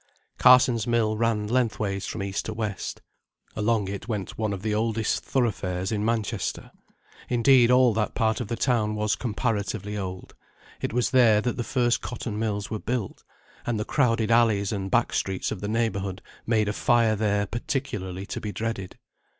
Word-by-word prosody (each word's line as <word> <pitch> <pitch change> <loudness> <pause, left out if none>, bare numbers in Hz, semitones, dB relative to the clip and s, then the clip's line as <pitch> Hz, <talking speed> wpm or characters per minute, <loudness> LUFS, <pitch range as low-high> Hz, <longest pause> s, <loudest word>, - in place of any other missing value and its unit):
Carsons' 125 -3 +6
mill 115 -2 +2
ran 110 -1 0
lengthways 110 -5 0
from - - -4
east 100 0 -3
to 110 - -4
west. 105 -3 -4 0.5
Along 110 -2 +1
it 100 +3 -6
went 105 -5 -4
one 110 -1 -1
of 100 -1 -5
the 110 -1 0
oldest 110 0 0
thoroughfares 95 -7 -1
in 105 -1 -1
Manchester. 110 -2 -2 0.6
Indeed 125 0 +5
all 125 -2 +5
that 105 0 -1
part 110 0 +1
of 120 - -4
the 115 - -2
town 110 -4 +1
was 105 0 0
comparatively 105 -3 -2
old; 95 -1 -6 0.5
it - - -2
was 125 +1 0
there 120 -5 +5
that 125 +2 -1
the 120 - -2
first 120 -1 +1
cotton 115 -3 -5
mills 105 -2 -2
were 110 - -2
built, 120 -3 -3 0.4
and 115 -3 -1
the 105 - -2
crowded 115 -5 +1
alleys 110 -4 +3
and 95 -2 -3
back - - +2
streets 95 -1 -1
of 110 - -5
the 105 - -3
neighbourhood 100 -4 -1 0.2
made 110 -2 +2
a 105 - 0
fire 115 -1 +3
there 105 -1 +1
particularly 105 -6 -4
to - - -5
be 105 - -4
dreaded. 110 -4 -4
110 Hz, 175 wpm, -26 LUFS, 105-115 Hz, 0.6 s, Carsons